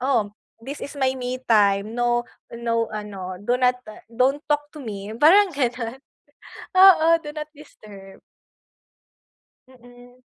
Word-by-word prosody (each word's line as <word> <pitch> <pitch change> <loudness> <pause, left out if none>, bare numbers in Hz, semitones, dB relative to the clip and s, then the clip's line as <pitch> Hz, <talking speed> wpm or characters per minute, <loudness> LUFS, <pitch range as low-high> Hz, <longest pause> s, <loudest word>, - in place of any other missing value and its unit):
"Oh, 230 -6 0 0.3
this 280 +2 -7
is 285 - -8
my 260 -1 +1
me 250 -1 -4
time, 205 -1 +2
no 240 0 0 0.3
no 230 -1 -1
ano, 200 -3 -7
do 240 +7 -2
not 250 0 +3 0.3
don't 255 +5 +1
talk 295 0 +1
to 305 - -10
me," 205 -3 -7
parang 370 +4 +6
ganun. 250 -2 -3 0.8
Oo, 335 -3 +7
do 295 - -8
not 305 0 -6
disturb. 200 -9 -15 1.4
Mm. 245 0 -19
245 Hz, 125 wpm, -22 LUFS, 215-280 Hz, 1.4 s, Oo